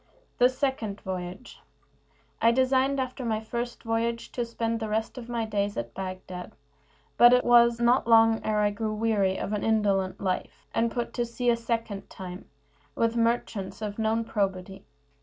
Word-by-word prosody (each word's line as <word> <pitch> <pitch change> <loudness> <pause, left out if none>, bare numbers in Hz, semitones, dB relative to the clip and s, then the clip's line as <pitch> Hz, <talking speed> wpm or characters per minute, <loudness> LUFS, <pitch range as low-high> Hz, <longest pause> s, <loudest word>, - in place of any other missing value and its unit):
THE 245 +1 +6
SECOND 255 -6 -2
VOYAGE 185 +4 -6 0.8
I 230 - +6
designed, 260 +2 +2
after 255 0 -3
my 220 -2 0
first 235 +2 -5
voyage, 230 +1 -1
to 245 - -2
spend 230 -1 -2
the 220 -1 -4
rest 220 +1 -2
of 240 -1 -10
my 235 -2 -1
days 205 -1 -2
at 115 0 -4
Bagdad, 185 -1 -7 0.6
but 240 +1 +8
it 250 - +4
was 235 -1 +5
not 240 +1 +3
long 225 -1 +5
ere 210 -1 +1
I 205 0 +2
grew 215 +1 -3
weary 210 -4 +1
of 205 - -3
an 210 - -2
indolent 200 -4 +1
life, 185 -2 -3
and 230 +1 +2
I - - -12
put 240 -1 -2
to 240 - 0
sea 240 +1 +1
a - - +3
second 230 -4 -3
time, 180 -1 -9 0.5
with 230 0 +1
merchants 230 -4 -1
of 205 +1 -4
known 225 +1 +1
probity. 190 -3 -3
225 Hz, 175 wpm, -27 LUFS, 200-235 Hz, 0.8 s, but